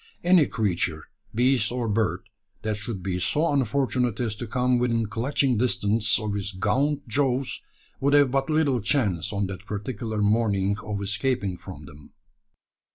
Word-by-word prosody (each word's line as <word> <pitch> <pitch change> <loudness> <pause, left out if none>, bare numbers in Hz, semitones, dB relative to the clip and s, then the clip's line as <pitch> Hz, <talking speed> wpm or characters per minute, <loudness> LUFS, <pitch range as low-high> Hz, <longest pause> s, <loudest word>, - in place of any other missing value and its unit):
Any 175 -5 +5
creature, 90 -7 -1 0.3
beast 125 +2 +3
or 120 -2 -2
bird, 100 -4 0 0.4
that 110 -1 -1
should 105 -2 -6
be 90 -1 -2
so 150 - +1
unfortunate 125 -3 0
as 115 -4 -1
to 120 - -5
come 125 +2 +1
within 115 -2 +1
clutching 125 +2 0
distance 110 -3 +2
of 105 -1 -3
his 100 0 -3
gaunt 140 +9 0
jaws, 130 +1 0 0.4
would 140 +1 +3
have 145 -3 +5
but 135 +2 0
little 150 -6 +2
chance 105 - 0
on 100 -1 -1
that 95 +2 -7
particular 110 +1 -4
morning 105 -2 +2
of 100 -2 -4
escaping 105 -1 -1
from 85 -5 -10
them. 75 +1 -15
115 Hz, 155 wpm, -25 LUFS, 100-130 Hz, 0.4 s, Any